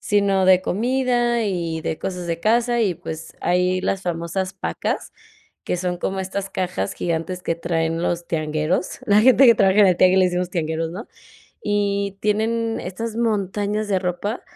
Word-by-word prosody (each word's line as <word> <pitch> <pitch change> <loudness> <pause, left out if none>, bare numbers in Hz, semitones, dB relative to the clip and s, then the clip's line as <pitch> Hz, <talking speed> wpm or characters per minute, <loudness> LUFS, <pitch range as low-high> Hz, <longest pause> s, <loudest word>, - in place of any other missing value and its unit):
sino 200 -2 +2
de 185 0 +6
comida 240 +2 +1
y 170 -5 -2
de 160 - -3
cosas 180 -2 -4
de 170 0 -3
casa, 235 +3 +2
y 195 -5 +1
pues, 160 0 -8
hay 180 +1 +1
las 195 0 -1
famosas 175 +2 -3
pacas, 190 - -3 0.5
que - - -1
son 180 0 -2
como 190 +1 -2
estas 195 +1 -4
cajas 100 - -2
gigantes 170 - -3
que 165 - -1
traen 165 -1 -1
los 175 -1 -1
tiangueros, 155 +2 -1
la 205 +1 +5
gente 260 +3 +6
que 235 - +8
trabaja 195 0 +4
en 200 - +7
el 180 -2 +3
tianguis 185 +1 +5
le 185 - +5
decimos 180 0 -2
tiangueros, 160 -2 -2
¿no?, 205 +8 -7 0.6
y 200 -1 -1
tienen 225 +2 0
estas 225 +5 -5
montañas 210 -1 -1
de 190 -2 +2
ropa, 185 +5 -3
190 Hz, 170 wpm, -22 LUFS, 175-210 Hz, 0.6 s, que